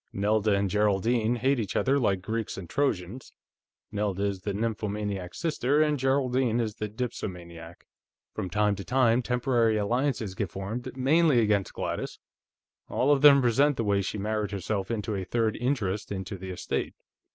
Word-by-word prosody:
Nelda 105 +1 +2
and 100 0 +1
Geraldine 105 +4 +1
hate 130 +3 +1
each 105 -4 -3
other 140 +2 +2
like 95 -7 +1
Greeks 110 +1 -3
and 95 -3 -7
Trojans. 120 - -2 0.6
Nelda 100 -2 -1
is 100 -2 -2
the 100 - -3
nymphomaniac 105 -3 -3
sister, 150 -3 0
and 150 -2 +2
Geraldine 130 -3 +1
is 110 -3 -1
the 105 - -3
dipsomaniac. 90 -7 -6 0.5
From 95 - -4
time 105 +2 +2
to 100 - -6
time, 125 -1 +3
temporary 120 -2 +1
alliances 115 -1 0
get 100 -2 -3
formed, 110 +8 -6
mainly 145 +1 +4
against 105 -3 +1
Gladys; - - -4 0.7
all 135 +3 +2
of 140 -2 +3
them 140 -2 +8
resent 135 +4 +3
the 115 - 0
way 100 -2 +2
she 100 +2 -3
married 105 0 -1
herself 100 0 -3
into 110 -1 -2
a 95 -2 -2
third 110 +3 0
interest 110 -6 -1
in 95 -1 -3
the 95 -1 -7
estate. 90 - -3
110 Hz, 165 wpm, -27 LUFS, 100-125 Hz, 0.7 s, them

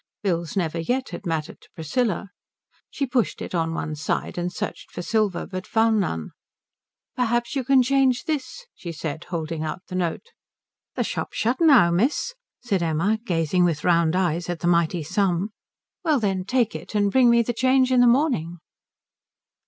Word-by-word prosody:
Bills 170 -3 -1
never 165 -2 -1
yet 255 +10 -1
had 200 - -7
mattered 160 -2 -3
to - - -20
Priscilla. 200 - -1 0.6
She 280 - -2
pushed 250 -4 0
it - - -6
on 165 -1 0
one 155 - -3
side 150 +1 -2
and 175 0 -2
searched - - -5
for 175 - -6
silver, 215 -2 0
but 185 -1 -6
found 225 -1 +3
none. 80 - -2 0.8
"Perhaps 240 +1 0
you 270 - 0
can 265 0 +4
change 265 -1 +2
this?" 315 - -4
she 170 - -7
said, 155 +1 -5
holding 165 -2 -4
out 160 +4 -4
the - - -8
note. 180 - -2 0.7
"The - - 0
shop's - - -4
shut 240 +4 +1
now, 275 - +6
miss," 250 - +1 0.3
said 200 -7 0
Laura, 170 +7 +1
gazing 175 -3 +1
with 165 -4 0
round 170 -1 +3
eyes 175 -2 0
at 175 -2 -3
the 175 - 0
mighty 170 -1 +2
sum. 185 +3 0 0.5
"Well 310 -5 +2
then 190 -4 -1
take 240 0 +1
it, - - -8
and 205 -1 +2
bring 255 0 +5
me 235 0 +5
the 240 - -2
change 260 +2 +3
in 255 - +4
the 245 - +6
morning." 235 - +2
190 Hz, 175 wpm, -24 LUFS, 170-245 Hz, 0.8 s, now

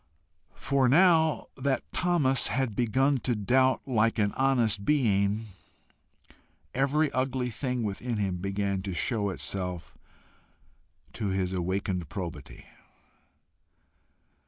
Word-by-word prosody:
For 135 -2 +1
now 160 +1 +4
that 135 0 -1
Thomas 155 -8 +2
had 130 -5 -1
begun 130 +4 +2
to 120 0 -1
doubt 130 +5 +2
like 115 -2 +1
an 100 -2 +1
honest 120 -7 +1
being, 110 -5 +1 1.2
every 140 +3 +1
ugly 130 -1 -1
thing 125 +1 -3
within 110 +3 -3
him 95 -3 -1
began 100 +1 -2
to 95 -2 -5
show 105 +1 -1
itself 90 -2 -5 1.2
to 110 - -3
his 95 -1 -1
awakened 90 -2 -2
probity. 85 -7 -7
115 Hz, 105 wpm, -28 LUFS, 100-135 Hz, 1.2 s, now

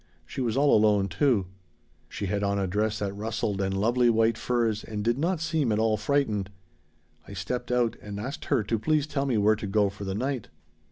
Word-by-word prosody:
She - - -5
was 120 0 0
all 145 +1 +5
alone, 105 -2 +3
too. 100 - +2 0.6
She 100 - -4
had 100 +1 -1
on 100 0 0
a 100 - 0
dress 105 +3 0
that 100 -2 -3
rustled 105 -1 -2
and 95 0 -1
lovely 120 +3 +3
white 115 0 +3
furs, 115 -3 0
and 105 -1 -5
did 120 +4 +1
not 170 +2 0
seem 155 -6 0
at 105 - +1
all 110 0 +2
frightened. 105 -4 0 0.8
"I - - -9
stepped 100 +7 -4
out 120 -2 +1
and 105 -1 -6
asked 130 +7 -5
her 130 -7 +1
to 110 +2 -1
please 155 +4 +1
tell 140 -2 -2
me 125 -4 +1
where 105 +1 +4
to 105 -1 -5
go 100 0 +2
for 100 0 -9
the 95 -1 -3
night. 130 +1 -2
110 Hz, 215 wpm, -27 LUFS, 100-125 Hz, 0.8 s, all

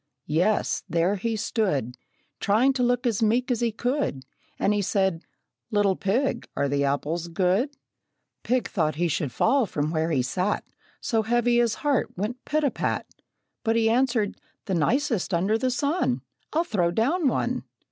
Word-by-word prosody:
Yes, 175 +8 +1
there 170 +4 +2
he 225 +3 -2
stood, 170 - -1 0.4
Trying 235 +7 +3
to 260 - -1
look 245 0 +1
as 230 -4 +1
meek 240 +4 +2
as 240 - +1
he 235 -1 +1
could, 245 - -2 0.3
And 205 - +2
he 205 - +1
said, 190 -3 +1 0.5
"Little 205 -2 +2
pig, 240 +10 0
are 140 - +2
the 140 0 0
apples 150 +5 -1
good?" 190 - 0 0.6
Pig 250 0 0
thought 155 -7 0
he 175 +3 +1
should 145 -4 -1
fall 260 - +2
from 150 -2 -2
where 160 0 0
he 135 -6 +1
sat, 180 +10 -1 0.4
So 225 -4 +1
heavy 240 +2 +2
his 235 -2 +2
heart 280 -10 +1
went 225 +7 -3
pit 310 +1 0
a 280 - +2
pat. - - -2 0.6
But 225 -1 +1
he 225 -1 +3
answered, 235 -4 +1 0.2
"The 190 - -2
nicest 225 - +1
under 190 +6 +2
the 255 +3 +1
sun! 270 - 0 0.3
I'll 325 +2 +2
throw 190 - +1
down 275 - +1
one!" - - 0
215 Hz, 165 wpm, -25 LUFS, 170-245 Hz, 0.6 s, Trying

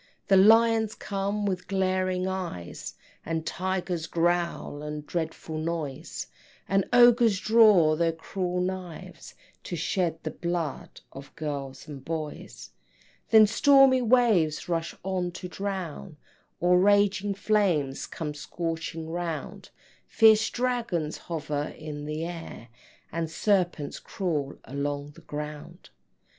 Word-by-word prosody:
Then 195 0 +7
lions 225 -1 +4
come 200 +1 -2
with 185 -2 -2
glaring 185 -1 0
eyes, 180 - -5 0.3
And 165 0 -3
tigers 180 -2 -2
growl, 170 -3 -1
a 150 0 -5
dreadful 160 0 -4
noise, 155 -4 -4 0.4
And 195 0 +2
ogres 240 -4 +6
draw 210 -9 +5
their 165 +1 +2
cruel 180 +2 -3
knives, 180 -2 -6 0.3
To 175 - -4
shed 165 0 -1
the - - -3
blood 170 -4 -4
of 135 +1 -12
girls 145 -3 -5
and 140 -3 -9
boys. 155 -1 -6 0.6
Then 220 -1 +8
stormy 270 +3 +5
waves 225 -10 +3
rush 170 -1 -2
on 185 -1 -1
to 180 - -7
drown, 185 -4 -5 0.4
Or 180 +1 +4
raging 205 0 +3
flames 190 -10 +1
come 150 -3 -5
scorching 165 +1 -4
round, 165 -1 -5 0.4
Fierce 220 0 +5
dragons 235 -11 -2
hover 150 -3 -3
in 150 -1 -7
the 155 +2 -3
air, 165 -8 -8 0.4
And 165 -1 -2
serpents 175 -4 0
crawl 155 -8 -3
along 145 +1 -3
the 170 - -16
ground. 150 +3 -8
175 Hz, 115 wpm, -27 LUFS, 155-195 Hz, 0.6 s, Then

